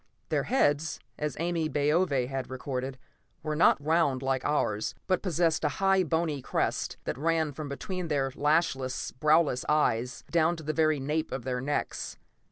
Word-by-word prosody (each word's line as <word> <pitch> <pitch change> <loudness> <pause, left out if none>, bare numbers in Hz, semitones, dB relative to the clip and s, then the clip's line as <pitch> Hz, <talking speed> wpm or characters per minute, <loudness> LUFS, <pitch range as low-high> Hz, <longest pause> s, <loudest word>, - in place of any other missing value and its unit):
Their - - +1
heads, 160 - +1 0.2
as 150 -3 -2
Ame 165 -2 -1
Baove 145 -2 +2
had 135 -1 -4
recorded, 130 0 -4 0.5
were 155 0 -2
not 160 - +5
round 145 -3 +1
like 130 -1 0
ours, 110 -8 0
but 185 -2 +1
possessed 170 -3 +1
a - - +3
high 195 -1 +4
bony 160 -4 0
crest - - -1
that - - -4
ran 160 0 +1
from 145 +1 -6
between 180 +4 -4
their 140 -3 0
lashless, 140 -3 0
browless 150 -4 +3
eyes, 125 -5 +1
down 170 0 +3
to 160 - -9
the 155 +1 -2
very 155 -2 +2
nape 150 +4 -2
of 130 - -4
their 125 0 -2
necks. 145 +3 -3
150 Hz, 165 wpm, -29 LUFS, 135-165 Hz, 0.5 s, not